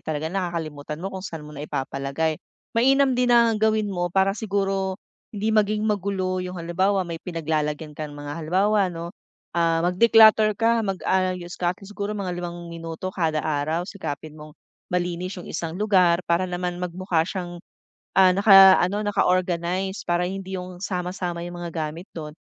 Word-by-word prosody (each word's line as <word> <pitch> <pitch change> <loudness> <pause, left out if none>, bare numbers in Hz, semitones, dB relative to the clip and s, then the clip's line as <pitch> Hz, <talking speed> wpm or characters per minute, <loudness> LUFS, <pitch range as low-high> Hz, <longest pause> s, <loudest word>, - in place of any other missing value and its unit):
talaga 155 0 -3
nakakalimutan 160 -6 -4
mo 195 - -4
kung 190 - -5
saan 160 -4 -6
mo 150 - -11
naipapalagay. 140 +2 -3 0.3
Mainam 270 +3 +4
din 250 0 +1
na 235 -1 +5
gawin 215 -2 +1
mo 175 -1 -1
para 190 +2 +2
siguro, 195 -2 -1 0.3
hindi 215 +1 -1
maging 215 0 +2
magulo 190 -3 -1
yung 180 0 -6
halimbawa 185 +3 0
may 165 -1 -6
pinaglalagyan 155 -2 -2
kang 150 -1 -7
mga 145 +2 -6
halimbawa 195 +5 +2
'no, 170 0 -7 0.4
ah, 165 -1 +1
mag 180 +1 -1
declutter 220 -2 +6
ka, 230 0 +2
mag-ayos 185 -3 -1
ka 175 -1 +2
at - - -25
least 210 - -11
siguro 205 +1 -4
mga 190 -3 -3
5 175 -1 -7
minuto 165 +3 -6
kada 160 -4 -1
araw, 155 +3 -1
sikapin 155 -6 -6
mong 150 -1 -12 0.3
malinis 180 +1 -2
yung 180 - -9
isang 165 +1 -4
lugar 185 -5 +4
para 175 +2 +1
naman 180 0 -3
magmukha 180 -1 -1
siyang, 175 -2 -5 0.6
ah, 185 -1 +7
naka-ano, 195 0 +6
naka-organize 185 -1 0
para 175 +1 +2
hindi 190 0 -5
yung 180 0 -8
sama-sama 180 -2 -3
yung 175 0 -7
mga 170 - -4
gamit 165 +3 -5
do'n. 150 -2 -6
180 Hz, 160 wpm, -24 LUFS, 165-195 Hz, 0.6 s, ah